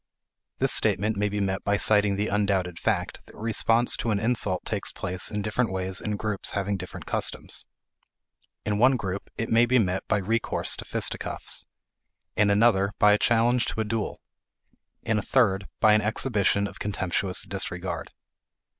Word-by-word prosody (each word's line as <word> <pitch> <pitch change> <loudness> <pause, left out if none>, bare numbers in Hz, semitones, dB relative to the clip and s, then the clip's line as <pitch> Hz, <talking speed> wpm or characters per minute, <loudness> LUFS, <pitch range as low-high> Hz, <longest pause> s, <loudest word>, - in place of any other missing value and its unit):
This - - +2
statement 105 +3 +3
may 105 0 0
be 105 +1 -3
met 95 -1 -1
by 100 0 +1
citing 105 -1 +3
the 105 +2 -1
undoubted 95 -4 0
fact - - -2
that - - -15
response 115 +2 +2
to 115 - -2
an 105 -2 +1
insult 110 -5 0
takes - - -3
place 90 0 -3
in 105 -1 -3
different 110 +1 0
ways 95 0 -2
in 105 -1 -2
groups 105 -3 -3
having 100 0 -1
different 90 -1 -8
customs. - - -2 1.0
In 105 -1 0
one 130 +2 +5
group, 100 -3 -5
it 115 - -3
may 115 +1 +5
be 130 +2 +3
met 95 -5 +1
by 110 - +2
recourse 110 +3 0
to - - -8
fisticuffs, - - -3 0.7
in 105 -1 +3
another 100 -1 +3
by 105 - +5
a 105 - +2
challenge 120 +1 +3
to - - -3
a - - -1
duel, 110 0 -3 0.8
in 110 -1 +1
a - - -2
third 100 -5 +2
by 110 -1 +5
an 105 - +4
exhibition 105 -2 +1
of - - -8
contemptuous 95 -2 -1
disregard. - - -4
105 Hz, 170 wpm, -26 LUFS, 100-115 Hz, 1.0 s, one